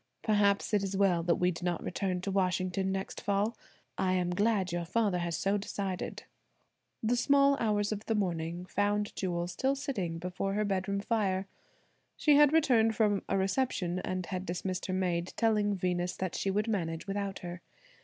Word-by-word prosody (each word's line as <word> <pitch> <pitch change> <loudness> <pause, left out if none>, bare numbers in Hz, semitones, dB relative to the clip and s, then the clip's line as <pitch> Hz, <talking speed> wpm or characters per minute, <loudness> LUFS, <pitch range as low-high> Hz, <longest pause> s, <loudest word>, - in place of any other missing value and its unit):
"Perhaps 205 -1 +2
it 205 - +4
is 195 0 -2
well 190 -4 +3
that 170 0 +2
we 180 0 +2
do 170 - -7
not 175 -1 -1
return 185 -1 -2
to 195 - -3
Washington 185 0 0
next 190 0 -4
fall. 205 +3 0 0.4
I 185 -1 +2
am 180 -1 +1
glad 200 -1 +1
your 175 0 -1
father 195 +1 +1
has 170 -2 -2
so 195 +1 +1
decided." 195 -2 -4 0.8
The 230 +3 +2
small 280 +3 +4
hours 210 -2 +1
of 215 0 -4
the 225 - +1
morning 175 -3 -2
found 205 +2 0
Jewel 175 -2 -1
still 260 +10 0
sitting 205 - -3
before 180 +3 -3
her 210 0 +1
bedroom 200 0 -1
fire. 200 -3 0 0.7
She 300 -2 +4
had 295 -1 +7
returned 240 -8 +4
from 210 -3 +2
a - - +2
reception, 190 -3 0
and 185 0 -3
had 185 0 -4
dismissed 185 +1 -3
her 185 - -2
maid, 180 -2 -1
telling 210 -3 +2
Venus 180 -1 -1
that 185 -2 -3
she 195 - -1
would 210 +3 0
manage 165 -7 -2
without 195 -1 -3
her. 175 +1 -6
195 Hz, 180 wpm, -31 LUFS, 180-210 Hz, 0.8 s, had